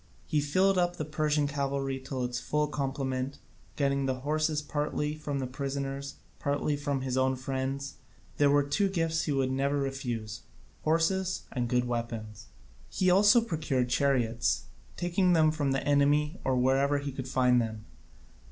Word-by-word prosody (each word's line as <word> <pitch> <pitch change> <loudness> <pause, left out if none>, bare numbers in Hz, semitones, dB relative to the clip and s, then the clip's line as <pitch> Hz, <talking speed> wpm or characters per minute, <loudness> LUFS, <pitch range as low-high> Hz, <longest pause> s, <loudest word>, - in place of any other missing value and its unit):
He 150 -3 +1
filled 185 +6 +2
up 175 0 +1
the 155 - -4
Persian 150 -1 +1
cavalry 140 -1 -2
to 130 -1 -4
its 125 0 -2
full 150 0 0
complement, 135 -2 -3 0.4
getting 140 -1 +1
the 130 -1 -2
horses 155 +2 0
partly 150 0 -2
from 150 -2 -4
the 135 - -2
prisoners, 140 +1 -4 0.2
partly 145 +1 0
from 145 -2 -2
his 130 -1 -2
own 130 0 +2
friends. 135 +1 -3 0.4
There 145 -1 +4
were 145 0 +4
two 145 +8 +1
gifts 165 -3 0
he 150 - -1
would 135 -2 +1
never 140 +2 0
refuse, 120 -5 -3 0.4
horses 175 +4 +1
and 125 -2 -1
good 125 0 +2
weapons. 115 -3 -4 0.4
He 185 -1 +2
also 205 +5 +6
procured 150 - -1
chariots, 120 - +1 0.3
taking 180 +1 +2
them 155 -2 +5
from 145 -3 -1
the 135 +1 -1
enemy 145 +3 +3
or 130 -1 +1
wherever 135 +3 +3
he 140 0 -3
could 130 -1 -6
find 125 -2 +3
them. 110 -2 -5
140 Hz, 160 wpm, -29 LUFS, 130-150 Hz, 0.4 s, also